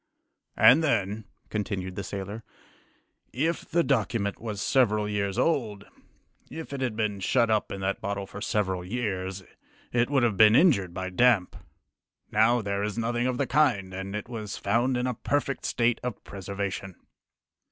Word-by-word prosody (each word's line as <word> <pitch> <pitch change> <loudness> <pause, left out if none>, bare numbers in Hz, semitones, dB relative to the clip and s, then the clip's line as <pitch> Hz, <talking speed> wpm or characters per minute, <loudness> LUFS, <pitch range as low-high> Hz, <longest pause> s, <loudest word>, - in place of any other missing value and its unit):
"And 150 +6 +7
then," 110 -6 0 0.3
continued 95 -3 -3
the 100 - -4
sailor, 100 +3 -6 0.9
"if 160 +7 -2
the 170 0 +2
document 110 -6 0
was 110 -3 -4
several 105 -4 +2
years 100 -2 -2
old, 110 -11 0 0.6
if 160 -3 -7
it 135 - -4
had 125 -4 -1
been 105 -2 -1
shut 115 +3 +2
up 110 -1 +1
in 100 - -5
that 95 +1 -2
bottle 100 0 -3
for 100 +1 -9
several 95 -5 -1
years, 95 -3 -3 0.5
it 120 +1 +2
would 135 -3 +2
have 110 -5 +1
been 110 +2 +7
injured 120 - +4
by 95 0 -4
damp. 110 -2 +3 0.8
Now, 110 +2 +3
there 100 0 -2
is 105 +1 -3
nothing 120 +1 0
of 130 -1 -1
the 140 - +1
kind, 120 -9 +2
and 95 +2 -5
it 105 - -4
was 110 -4 -6
found 120 +5 +1
in 125 - -1
a 125 - 0
perfect 140 +3 -2
state 120 0 +1
of 125 -4 -5
preservation." 100 -1 -5
105 Hz, 165 wpm, -27 LUFS, 100-125 Hz, 0.9 s, And